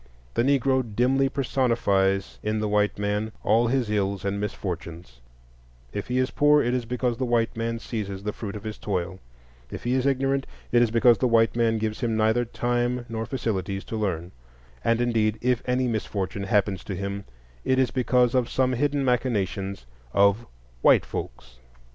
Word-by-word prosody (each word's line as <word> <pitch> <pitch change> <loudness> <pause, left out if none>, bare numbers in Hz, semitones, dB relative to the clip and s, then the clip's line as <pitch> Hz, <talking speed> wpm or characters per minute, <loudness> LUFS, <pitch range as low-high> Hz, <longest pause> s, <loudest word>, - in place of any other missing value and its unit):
The - - +1
Negro 135 0 +3
dimly 130 +4 +1
personifies 115 -8 +1
in 105 +1 -1
the 105 0 -1
white 105 0 +1
man 105 +2 -1
all 115 +3 +3
his 130 -1 +1
ills 100 -2 -1
and 100 +1 -1
misfortunes; 85 -9 -6 0.7
if 100 - -4
he 125 - -1
is 130 +1 +1
poor, 150 0 +4
it 120 -3 +1
is 125 -2 -1
because 125 0 -1
the 130 - -2
white 120 -2 +1
man 115 0 -2
seizes 100 -4 -5
the 105 0 -2
fruit 105 -2 -6
of 105 - -7
his 110 -1 -6
toil; 95 -2 -3 0.5
if - - -7
he 120 - 0
is 130 +1 +1
ignorant, 135 0 +1 0.2
it 120 - +5
is 120 - +3
because 115 +1 +4
the 130 - +2
white 115 -1 +3
man 115 -1 +2
gives 110 0 -2
him 115 -3 0
neither 110 +2 +2
time 120 +1 -1
nor 115 -1 -3
facilities 100 -6 -2
to - - -6
learn; 90 -5 -2 0.5
and, 115 +1 +2
indeed, 110 -3 +1
if 125 -1 +1
any 125 0 +2
misfortune 100 -3 -3
happens 100 -1 +1
to 100 - -4
him, 100 +1 -4 0.4
it 130 - +2
is 130 -2 +2
because 125 -1 +2
of 125 -2 +1
some 130 -1 +1
hidden 140 +2 0
machinations 100 - -1 0.3
of 100 +3 +3 0.3
"white - - +5
folks." - - -7
115 Hz, 180 wpm, -25 LUFS, 100-125 Hz, 0.7 s, it